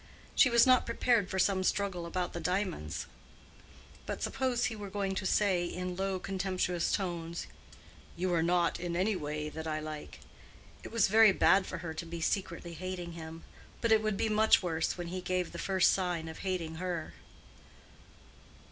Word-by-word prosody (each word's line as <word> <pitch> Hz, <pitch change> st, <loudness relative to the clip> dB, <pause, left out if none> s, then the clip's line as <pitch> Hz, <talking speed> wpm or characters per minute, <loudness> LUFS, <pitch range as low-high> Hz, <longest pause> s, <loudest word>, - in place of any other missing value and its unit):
She 255 Hz, -, +6 dB
was 235 Hz, +1 st, +6 dB
not 255 Hz, -1 st, +6 dB
unprepared 230 Hz, -3 st, +1 dB
for 190 Hz, -, -3 dB
some 190 Hz, 0 st, +2 dB
struggle 185 Hz, -3 st, -1 dB
about 180 Hz, +1 st, -2 dB
the 170 Hz, -, -4 dB
diamonds; 180 Hz, -, -2 dB, 1.0 s
but -, -, -4 dB
suppose 255 Hz, -2 st, 0 dB
he 230 Hz, -, -2 dB
were 205 Hz, -2 st, -7 dB
going 195 Hz, 0 st, -2 dB
to 190 Hz, 0 st, -2 dB
say, 190 Hz, -4 st, +2 dB
in 180 Hz, +1 st, -4 dB
low, 195 Hz, 0 st, -1 dB
contemptuous 185 Hz, -2 st, -1 dB
tones, 170 Hz, -3 st, -2 dB, 0.7 s
"You 180 Hz, +1 st, 0 dB
are 165 Hz, -, +3 dB
not 170 Hz, 0 st, +2 dB
in 175 Hz, -1 st, -3 dB
any 195 Hz, +4 st, +1 dB
way 150 Hz, -2 st, -3 dB
what 160 Hz, +1 st, -6 dB
I 155 Hz, -1 st, -1 dB
like." 155 Hz, -1 st, -7 dB, 0.6 s
It -, -, -8 dB
was 230 Hz, -3 st, +3 dB
very 220 Hz, +1 st, +7 dB
bad 190 Hz, 0 st, +4 dB
for 185 Hz, -, -4 dB
her 160 Hz, -, -4 dB
to 160 Hz, +1 st, -5 dB
be 170 Hz, 0 st, -5 dB
secretly 170 Hz, -1 st, -2 dB
hating 180 Hz, 0 st, -5 dB
him; 165 Hz, 0 st, -9 dB, 0.4 s
but 230 Hz, -, 0 dB
it 220 Hz, -1 st, +6 dB
would 215 Hz, -2 st, -1 dB
be -, -, +1 dB
much 220 Hz, -1 st, +4 dB
worse 165 Hz, -1 st, -1 dB
when 175 Hz, -1 st, -5 dB
he 185 Hz, +1 st, -4 dB
gave 180 Hz, -1 st, -1 dB
the 170 Hz, -, -7 dB
first 190 Hz, -2 st, +3 dB
sign 175 Hz, -4 st, -1 dB
of 160 Hz, -, -8 dB
hating 170 Hz, -4 st, -3 dB
her. 175 Hz, -3 st, -3 dB
180 Hz, 180 wpm, -31 LUFS, 170-195 Hz, 1.0 s, very